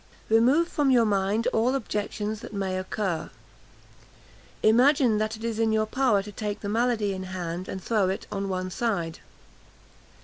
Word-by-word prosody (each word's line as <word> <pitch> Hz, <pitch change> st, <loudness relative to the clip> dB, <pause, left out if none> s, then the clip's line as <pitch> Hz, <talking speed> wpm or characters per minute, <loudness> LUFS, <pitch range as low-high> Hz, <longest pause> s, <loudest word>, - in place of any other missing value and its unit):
"Remove 250 Hz, +10 st, +4 dB
from 295 Hz, -4 st, +1 dB
your 245 Hz, -3 st, +5 dB
mind 205 Hz, +2 st, +1 dB
all 240 Hz, +4 st, +2 dB
objections 210 Hz, -2 st, -3 dB
that 210 Hz, -, -9 dB
may 190 Hz, -2 st, -2 dB
occur. 185 Hz, -2 st, -2 dB, 1.3 s
"Imagine 245 Hz, 0 st, +4 dB
that 215 Hz, +1 st, -2 dB
it 225 Hz, -, -11 dB
is 230 Hz, -1 st, -2 dB
in 225 Hz, -1 st, +2 dB
your 215 Hz, 0 st, +2 dB
power 215 Hz, -4 st, +2 dB
to 210 Hz, -, -9 dB
take 205 Hz, 0 st, -4 dB
the 200 Hz, -, -4 dB
malady 225 Hz, -2 st, +1 dB
in 190 Hz, -, -5 dB
hand, 180 Hz, -1 st, -5 dB
and 190 Hz, -, -5 dB
throw 210 Hz, -5 st, +1 dB
it 190 Hz, -, -3 dB
on 195 Hz, -1 st, -3 dB
one 185 Hz, 0 st, -3 dB
side. 180 Hz, -8 st, -2 dB
215 Hz, 165 wpm, -26 LUFS, 195-230 Hz, 1.3 s, your